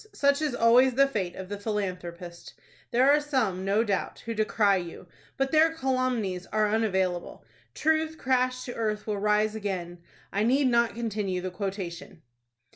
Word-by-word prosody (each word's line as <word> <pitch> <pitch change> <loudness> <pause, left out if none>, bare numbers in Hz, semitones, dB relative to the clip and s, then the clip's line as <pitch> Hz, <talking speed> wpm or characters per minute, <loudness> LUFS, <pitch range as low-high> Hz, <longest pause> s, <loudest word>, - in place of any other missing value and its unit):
Such 280 +1 +2
is 295 -5 -1
always 245 +2 +5
the 275 +1 +6
fate 195 -9 -3
of 190 - -7
the 205 +1 -6
philanthropist. 180 -5 -5 0.3
There 255 +4 +4
are 295 +1 +4
some, 250 -11 -1
no 200 +3 +2
doubt, 200 -4 -2
who 230 - -3
decry 215 -2 +2
you, 175 0 -7 0.3
but 270 0 0
their 320 +1 +4
calumnies 255 - -1
are 215 0 +1
unavailable. 190 - -1 0.3
'Truth 315 0 +1
crashed 255 -1 0
to 245 - -5
earth 215 -2 -2
will 210 -2 -2
rise 210 +1 +2
again.' 185 -5 -4 0.3
I 200 - 0
need 260 +6 +3
not 235 -1 +2
continue 210 -5 -2
the 185 0 -4
quotation." 190 -2 -6
215 Hz, 160 wpm, -27 LUFS, 190-255 Hz, 0.3 s, the